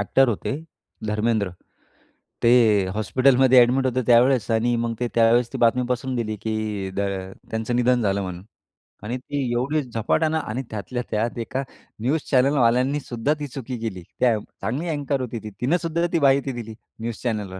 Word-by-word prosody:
Actor 130 +6 +3
होते 115 +2 -2 0.5
धर्मेंद्र. 105 -1 0 0.9
ते 115 - +5 0.4
हॉस्पिटलमध्ये 130 +4 +4
एडमिट 130 +2 +3
होते 130 0 +1
त्यावेळेस 125 -1 +4
आणि 115 +2 +2
मग 115 0 -1
ते 120 - 0
त्यावेळेस 115 +1 +4
ती - - -2
बातमी 120 +2 +3
पसरून 130 +1 -1
दिली, 110 -2 -2
की 110 -3 -3
द - - -2 0.5
त्यांचं 110 +2 -2
निधन 125 0 +3
झालं 100 -2 +1
म्हणून. 90 -1 -6 0.6
आणि 120 +4 -3
ती 140 +3 -4
एवढी 140 +6 0
झपाट्यानं 135 +6 0
आणि 130 -4 -3
त्यातल्या 115 +4 -4
त्यात 115 +3 -1
एका 130 +4 -3 0.4
न्यूज 140 +7 +1
चॅनेल 135 +2 +4
वाल्यांनी 125 +4 +3
सुद्धा 125 +1 -1
ती 145 - -4
चुकी 130 -1 -6
केली. 105 -6 -5 0.2
त्या 120 -4 +3 0.2
चांगली 140 +10 -2
एंकर 145 -3 -1
होती 120 -2 -4
ती. 110 - -6
तिनं 140 +8 +2
सुद्धा 170 +1 0
ती 170 - +3
माहिती 140 -1 +3
दिली 115 -3 -7 0.3
न्यूज 115 -1 -3
चॅनलवर. 105 -6 -3
120 Hz, 165 wpm, -23 LUFS, 110-135 Hz, 0.9 s, ते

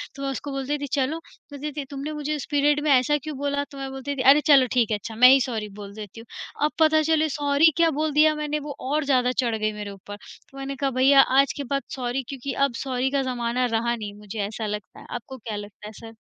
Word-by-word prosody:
तो 275 - -9
मैं 275 - -1
उसको 280 +1 -5
बोल 270 -1 -4
थी 290 -1 -2
चलो, 275 +3 -1
बोलती 300 -2 -9
थी 285 -1 -5
तुमने 280 +2 -5
मुझे 300 0 -3
उस 290 - -5
पीरियड 290 +1 +3
में 300 - +2
ऐसा 265 +3 +4
क्यों 305 -3 -6
बोला 285 0 -1
तो 280 - -11
मै 270 0 -5
बोलती 270 +1 -5
थी 260 - -2
अरे 300 - +2
चलो 275 -4 +6
ठीक 235 -4 +2
है 210 - +1
अच्छा 220 +2 -8
मैं 250 +3 +8
ही 270 +1 +7
सॉरी 225 -5 -3
बोल 200 -1 -8
देती 215 +1 -9
हूँ। 230 - -12 0.4
अब 305 - 0
पता 315 0 +5
चले 315 0 +2
सॉरी 290 +2 +3
क्या 335 -1 +4
बोल 310 -1 0
दिया 305 +1 +5
मैंने 300 0 -2
वो 290 -1 -7 0.2
और 305 0 +1
ज़्यादा 250 -2 +2
चढ़ 240 -3 0
गई 215 0 -1
मेरे 210 -1 -6
ऊपर। 200 +1 -10 0.4
तो 275 - -14
मैंने 275 0 -5
कहा 275 0 -1
भैया 270 +2 +6 0.2
आज 275 - +3
के 285 - -3
बाद 275 - +1
सॉरी 250 +1 -2
क्योंकि 275 0 -5
अब 275 - -4
सॉरी 260 0 -1
का 280 -1 +1
ज़माना 240 +1 -1
रहा 235 0 0
नहीं 210 -3 -7
मुझे 210 +1 -8
ऐसा 220 +1 -5
लगता 210 0 -6
है। - - -14
आपको 260 +3 -7
क्या 220 -2 -6
लगता 205 0 -9
है - - -8
सर? 225 +2 -11
270 Hz, 260 wpm, -24 LUFS, 235-290 Hz, 0.4 s, मैं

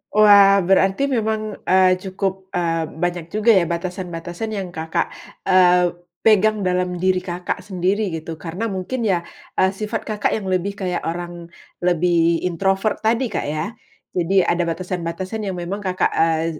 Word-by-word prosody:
Wah 200 -2 +7
berarti 195 +7 +3
memang, 220 -4 -1
eee, 185 0 +4
cukup, 190 0 -4
eee, 165 -2 0 0.2
banyak 175 -2 -1
juga 215 +1 +4
ya 185 - +4
batasan-batasan 175 +3 -4
yang 195 -3 -3
Kakak, 160 0 -1 0.4
eee, 180 -1 +5 0.3
pegang 215 0 +4
dalam 180 -1 -1
diri 185 0 +1
Kakak 180 0 -4
sendiri 190 +2 -1
gitu 160 +1 -7
karena 180 +8 -4
mungkin 215 +5 -3
ya, 175 -4 +1 0.3
eee, 190 - +3
sifat 215 +3 -4
Kakak 210 -1 -1
yang 195 -4 -3
lebih 185 +2 -1
kayak 185 -3 -3
orang, 175 0 -5 0.3
lebih 170 -1 +2
introvert 195 +4 0
tadi, 230 +2 0
Kak, - - -2
ya. 155 +7 -2 0.4
Jadi 185 +2 +2
ada 175 0 +1
batasan-batasan 185 +4 -4
yang 190 - -3
memang 175 +3 -4
Kakak, 185 -2 0
eee, 160 -1 +1
185 Hz, 150 wpm, -21 LUFS, 175-200 Hz, 0.4 s, Wah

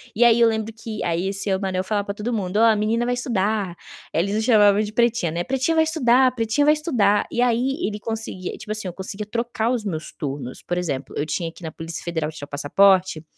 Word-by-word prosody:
E 240 - +4
aí 235 0 +5
eu 230 - +6
lembro 220 0 -3
que, 225 -1 -6
aí 175 +3 -1
seu 195 -1 -1
Manuel 190 -1 -1
falava 205 +1 -1
para 200 - -3
todo 235 +3 -3
mundo: 200 -2 -2
"Ó, 225 - +5
a 220 -1 +5
menina 225 +3 0
vai 245 - 0
estudar", 210 -6 -1 0.4
eles 200 +5 0
o - - +1
chamavam 210 -3 +5
de 210 0 -3
pretinha, 235 -8 +1
né. 170 +1 -2
"Pretinha 270 - 0
vai 320 - +5
estudar, 260 -5 +3
pretinha 230 +5 +1
vai 300 - +6
estudar". 230 -10 +1
E 240 - 0
aí 250 +5 +1
ele 210 0 -4
conseguia, 220 -5 -5
tipo 215 - -8
assim, 215 -3 -3
eu - - -8
conseguia 195 +2 -5
trocar 235 0 -1
os 230 -4 -2
meus 160 -5 -4
turnos. 135 -3 -6
Por 175 - -2
exemplo, 140 -6 -4
eu 145 - 0
tinha 165 +2 -2
que 180 - -17
ir - - -5
na 160 - -5
Polícia 165 +1 -6
Federal 160 -3 -2
tirar 145 -2 -9
passaporte, 180 +3 +3
210 Hz, 235 wpm, -22 LUFS, 180-235 Hz, 0.4 s, eu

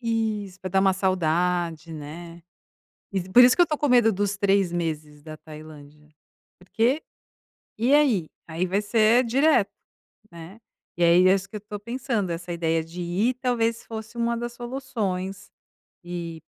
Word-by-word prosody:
Isso, 220 -5 -2
pra 185 - -5
dar 190 +1 +3
uma 190 0 +4
saudade, 175 -3 0
né. 165 +3 -9 0.9
Por 250 - +9
isso 250 +1 +6
que - - +4
eu - - +9
estou 305 -3 -2
com 295 - 0
medo 240 -3 +5
dos 205 0 -1
3 195 -2 +2
meses 155 -3 -4
da 155 +1 -10
Tailândia. 150 -1 -13 0.5
Porque, 230 - 0 0.8
e 240 +5 +2
aí? 245 - +3 0.2
Aí 165 +3 -2
vai 190 +3 0
ser 225 +3 +3
direto, 250 -2 +3 0.6
né. 170 +5 -11 0.4
E 175 - +1
aí 175 +2 +6
é 185 - +6
isso 195 0 -1
que 215 - -11
eu - - -4
estou 205 0 -8
pensando, 235 -3 -3
essa 175 +1 -5
ideia 165 -1 0
de 165 +2 -9
ir 195 +9 0
talvez 235 -2 -1
fosse 220 +1 -8
uma 235 0 0
das 240 0 -5
soluções. 220 -7 -4 0.6
E 170 -2 -6
195 Hz, 160 wpm, -24 LUFS, 170-230 Hz, 0.9 s, Por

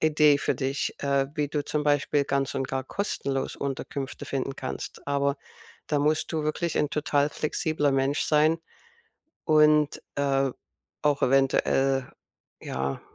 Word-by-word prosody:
Idee 150 -2 +4
für - - 0
dich, 135 0 -2
äh, 140 -1 +2
wie 150 -3 -1
du 145 -1 -2
zum 150 -1 -1
Beispiel 145 0 +2
ganz 140 0 -1
und 135 -1 -2
gar 130 -1 -2
kostenlos 140 -7 -2
Unterkünfte 135 0 -4
finden 135 0 -2
kannst, 130 - -6
aber 140 0 +1 0.5
da 145 -2 0
musst 150 +3 +1
du 160 - -1
wirklich 160 +2 -1
'n 150 - +1
total 145 -1 +1
flexibler 155 -1 0
Mensch 135 +2 +1
sein 155 +2 +3 0.9
und, 150 -1 +4
äh, 135 -1 +1 0.5
auch 145 -1 +2
eventuell, 135 0 +2 0.5
ja, 65 +1 -3
140 Hz, 135 wpm, -26 LUFS, 135-150 Hz, 0.9 s, Idee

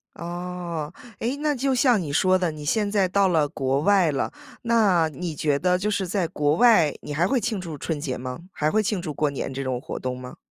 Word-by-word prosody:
哦。 175 -2 -5 0.3
诶， 245 +5 -1
那 295 0 0
就 265 +1 0
像 245 -4 +4
你 150 -5 -4
说 185 +4 +3
的， 180 -2 0
你 155 -1 -8
现 205 +6 +1
在 200 -3 +2
到 200 +1 +3
了 155 -5 +2
国 135 -1 -1
外 190 -2 +4
了， 135 - -2 0.3
那 210 -8 +3
你 160 +2 -5
觉 145 -1 +1
得 180 +3 +2
就 205 +3 -1
是 200 -2 -1
在 185 -1 0
国 150 -2 +1
外 195 -11 +5
你 150 - -6
还 165 +4 +2
会 255 +5 +1
庆 215 -3 -2
祝 165 -4 -6
春 155 +1 -3
节 135 -4 -3
吗？ 125 0 -5
还 155 +1 0
会 215 +4 +2
庆 205 -2 -1
祝 155 -4 -4
过 150 0 +1
年 135 - -4
这 135 +1 -4
种 130 -2 -2
活 - - -6
动 125 0 -3
吗？ 125 0 -9
175 Hz, 250 characters per minute, -24 LUFS, 150-200 Hz, 0.3 s, 外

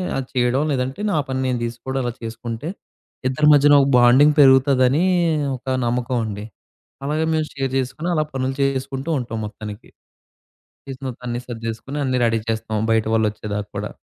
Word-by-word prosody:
అది 135 -1 -3
చేయడం. 125 +2 +2
లేదంటే 130 +7 -2
నా 155 - +1
పని 130 0 -2
నేను 125 -2 -1
తీసుకోవడం 120 +3 -4
అలా 120 - -1
చేసుకుంటే 115 +4 -6 0.6
ఇద్దరి 150 +4 +2
మధ్యన 145 0 +6
ఒక 135 - +2
బాండింగ్ 130 +5 +6
పెరుగుతాదని 135 +2 +5 0.5
ఒక 130 - -13 0.2
నమ్మకమండి. 120 -4 -2 0.6
అలాగే 155 +2 0
మేం 155 -1 +1
షేర్ 135 -1 -2
చేసుకొని 135 +7 -3
అలా 155 - +2
పనులు 130 0 -2
చేసుకుంటూ 135 +2 -2
ఉంటాం 115 -2 -5
మొత్తానికి. 105 +1 -9 1.0
చేసిన 135 0 -8
తర్వాత 125 -2 -6
అన్నీ 120 +1 -2
సర్దేసుకొని 115 +4 -5
అన్నీ 130 -1 0
రెడీ 115 -1 +2
చేస్తాం 110 -1 -2
బయట 110 -1 +2
వాళ్ళు 110 -1 +3
వచ్చేదాకా 105 -1 -5
కూడా. 105 +1 -3
130 Hz, 155 wpm, -21 LUFS, 115-135 Hz, 1.0 s, మధ్యన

